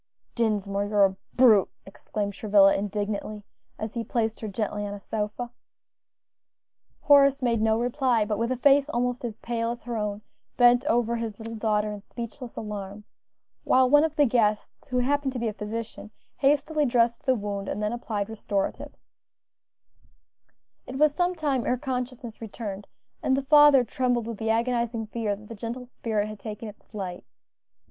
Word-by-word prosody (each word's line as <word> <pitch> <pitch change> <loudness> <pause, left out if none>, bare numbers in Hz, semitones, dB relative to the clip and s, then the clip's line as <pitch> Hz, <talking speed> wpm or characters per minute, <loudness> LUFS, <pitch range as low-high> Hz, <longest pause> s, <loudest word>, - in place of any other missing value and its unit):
"Dinsmore, 205 -3 0
you're 205 -1 +4
a 190 0 -1 0.2
brute!" 225 -6 +6 0.2
exclaimed 200 +1 -4
Travilla 200 -1 +5
indignantly, 205 +1 -3 0.3
as 215 0 -5
he 235 - -2
placed 225 0 -1
her 220 - -5
gently 210 0 -3
on 205 0 -4
a - - -9
sofa. 215 +4 -4 1.5
Horace 280 -2 +5
made 235 -3 +1
no 220 0 +3
reply, 245 -2 +1
but, 210 0 -2
with 235 +2 0
a 255 - 0
face 280 +3 +4
almost 245 -2 -1
as 225 -3 -4
pale 230 -1 -2
as 235 0 -5
her 240 -1 -4
own, 210 0 -3 0.3
bent 245 0 +6
over 235 -2 +1
his 225 -3 -4
little 225 +1 -7
daughter 215 -1 0
in 205 -1 -7
speechless 235 +3 -8
alarm, 205 -1 -6 0.6
while 260 0 +4
one 290 +3 +6
of 315 -1 -1
the 295 -2 +4
guests, 220 -2 0
who 255 -2 -2
happened 270 +2 +1
to - - -4
be 235 - -1
a 215 - -2
physician, 215 +1 -6 0.3
hastily 295 +2 +2
dressed 235 0 +1
the 260 - +4
wound, 200 -2 -4
and 210 - -3
then 210 +2 0
applied 215 -4 -3
restoratives. 210 -3 -4 1.8
It 255 - -7
was 300 0 +4
some 355 +2 0
time 285 -6 0
ere 250 - +1
consciousness 250 -3 -5
returned, 205 -2 -6 0.3
and 265 - +2
the 275 - -1
father 295 -2 +7
trembled 245 0 0
with 230 -2 -6
the 220 -1 -2
agonizing 235 0 0
fear 215 -1 -2
that 210 +1 -14
the 230 - -8
gentle 230 +3 -6
spirit 220 -4 -2
had 215 -1 -8
taken 215 +1 -7
its 210 - -12
flight. 190 -4 -6
230 Hz, 170 wpm, -26 LUFS, 210-250 Hz, 1.8 s, father